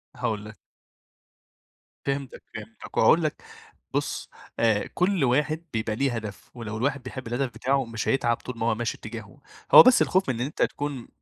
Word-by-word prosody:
هاقول 105 -1 -2
لك. 110 0 -11 1.5
فهمتك 140 -1 -3
فهمتك 110 +1 -9
وهاقول 165 +9 +5
لك 155 - -2 0.5
بُص - - -2 0.3
آآ 110 -3 +2
كل 180 -3 +2
واحد 150 +6 +1
بيبقى 110 -1 -1
ليه 135 +1 0
هدف، 110 -4 -7
ولو 115 -3 -6
الواحد 135 +3 -1
بيحب 130 0 -7
الهدف 125 +3 -1
بتاعه 135 +4 0
مش 115 -2 -4
هيتعب 120 -3 +2
طول 125 -2 -8
ما 115 - -1
هو 115 -1 +2
ماشي 120 +1 -2
اتجاهة، 110 +3 -9 0.3
هو - - +13
بس 255 -1 +6
الخوف 185 -5 +2
من 130 - +1
إن 120 - 0
أنت 145 - -6
تكون 145 -4 -3
120 Hz, 170 wpm, -26 LUFS, 110-140 Hz, 1.5 s, هو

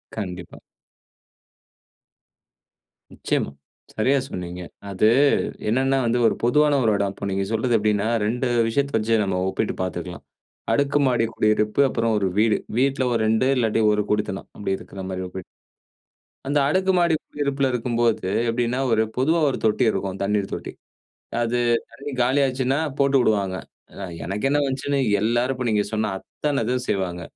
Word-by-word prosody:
கண்டிப்பா. 90 -5 -6 2.5
நிச்சயமா, - - -2 0.4
சரியா 135 +6 +2
சொன்னீங்க. 90 0 -6 0.3
அது 100 +2 +2 0.6
என்னன்னா 135 +3 +2
வந்து 120 +1 +1
ஒரு - - +1
பொதுவான 145 +3 +3
ஒரு 110 - +3
எடம். 100 -1 -1
இப்ப 100 - -6
நீங்க 95 0 -1
சொல்றது 115 +2 +1
எப்படினா, 105 0 +1 0.2
2 125 +4 0 0.2
விஷயத்த 140 +1 0
வச்சு 110 0 +1
நம்ம 95 -2 -1
ஒப்பிட்டு 110 - -2
பார்த்துக்கலாம். 90 -1 -5 0.5
அடுக்கு 140 +4 +2
மாடி 120 -3 +2
குடியிருப்பு 110 +3 +1
அப்புறம் 115 -1 0
ஒரு 100 - 0
வீடு. 110 -2 +3 0.2
வீட்ல 135 0 +2
ஒரு 115 - +1
2 110 +4 +2
இல்லாட்டி 115 -2 +1
ஒரு 105 -1 +1
குடித்தனம் 105 -2 -2
அப்டி 95 -2 -1
இருக்கிற 95 - -9
மாரி 95 0 -4
ஒப்பிட். 95 0 -8 1.0
அந்த 145 +1 +1
அடுக்கு 185 +5 +2
மாடி 170 -2 +3
குடியிருப்பில 140 -2 -2
இருக்கும்போது 115 -4 0 0.2
எப்படின்னா, 120 +2 0
ஒரு 110 0 +3
பொதுவா 160 +6 +2
ஒரு - - -2
தொட்டி 110 +4 +2
இருக்கும் 95 -1 -3
தண்ணீர் 100 0 0
தொட்டி. - - -5 0.7
அது 120 +1 0 0.3
தண்ணி 140 +1 -8
காலியாச்சுனா 130 +1 +1 0.2
போட்டு 140 0 +3
விடுவாங்க. 100 -5 +1 0.7
எனக்கு 105 +8 -2
என்ன 145 +1 +2
வந்துச்சுன்னு 140 +1 -1 0.2
எல்லாரு 120 +4 +1
இப்ப 125 -1 -4
நீங்க 105 -1 +2
சொன்ன 110 -1 0
அத்தன 145 +2 -3
இது 125 - 0
செய்வாங்க. 90 -3 -2
115 Hz, 145 wpm, -23 LUFS, 105-135 Hz, 2.5 s, பொதுவான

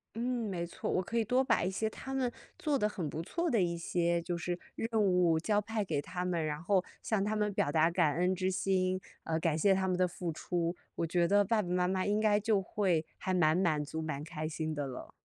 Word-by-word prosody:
嗯， 235 -1 -1
没 175 -2 -2
错， - - -4
我 185 - +1
可 230 +6 -2
以 225 - +2
多 255 +4 +2
把 230 -8 +2
一 185 - 0
些 220 +3 -1
他 270 +4 -7
们 255 -3 0 0.3
做 300 -6 +1
得 210 - +2
很 175 -7 -4
不 160 - -4
错 340 - -1
的 230 -7 +3
一 170 -1 +1
些 170 0 0
就 175 0 -2
是 175 +1 -2 0.2
任 225 - -3
务 180 -4 +3
交 205 +5 +1
派 215 0 -2
给 145 - -1
他 180 +5 -4
们， 170 -3 0
然 150 +1 -3
后 190 0 +3 0.2
向 215 -3 0
他 215 +1 0
们 210 -1 0
表 145 - +1
达 160 +2 +4
感 165 -4 +2
恩 180 +2 +2
之 185 +1 0
心， 185 -1 +1 0.2
呃， 160 0 0
感 160 -1 +1
谢 195 +4 +4
他 190 0 0
们 185 -1 +1
的 180 0 +2
付 170 -1 -4
出， 170 +1 -2 0.2
我 165 - 0
觉 170 +1 +2
得 205 +1 +5
爸 220 +2 +2
爸 175 - -6
妈 180 0 +2
妈 185 0 0
应 205 +1 +2
该 210 -1 +3
就 210 -1 +2
会 180 -5 +1
还 185 -1 -1
蛮 160 -2 +4
满 155 -5 +2
足、 160 +2 -5
蛮 150 -2 -4
开 155 -1 -4
心 155 0 -3
的 145 -2 -2
了。 130 - -8
180 Hz, 270 characters per minute, -32 LUFS, 165-205 Hz, 0.3 s, 得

